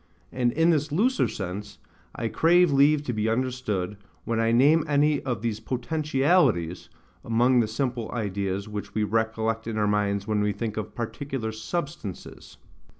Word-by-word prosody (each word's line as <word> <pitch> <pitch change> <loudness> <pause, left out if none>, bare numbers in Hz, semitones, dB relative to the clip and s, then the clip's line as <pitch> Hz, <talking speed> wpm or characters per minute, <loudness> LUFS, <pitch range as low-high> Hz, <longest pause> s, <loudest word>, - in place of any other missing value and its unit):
And 125 -2 +1
in 165 +2 +3
this 150 -1 0
looser 240 - +2
sense 100 +2 -6 0.4
I 115 - -2
crave 175 +6 +4
leave 145 +2 +4
to 125 - -3
be 110 0 0
understood, 115 -6 -2 0.3
when 115 -1 -1
I 115 0 +2
name 145 +7 +5
any 145 0 +2
of 120 -4 -3
these 110 -2 -1
POTENTIALITIES 130 - +1 0.3
among 120 +2 +3
the 115 - +2
simple 120 0 -3
ideas 100 -3 -2
which 105 -1 -7
we 110 - +1
recollect 110 +1 -1
in 110 -1 -3
our 105 - +2
minds 100 -1 0
when 105 -1 0
we 105 0 +1
think 110 +1 -4
of 105 -1 -5
PARTICULAR 120 -1 -4
SUBSTANCES. 115 - -6
115 Hz, 155 wpm, -26 LUFS, 105-140 Hz, 0.4 s, name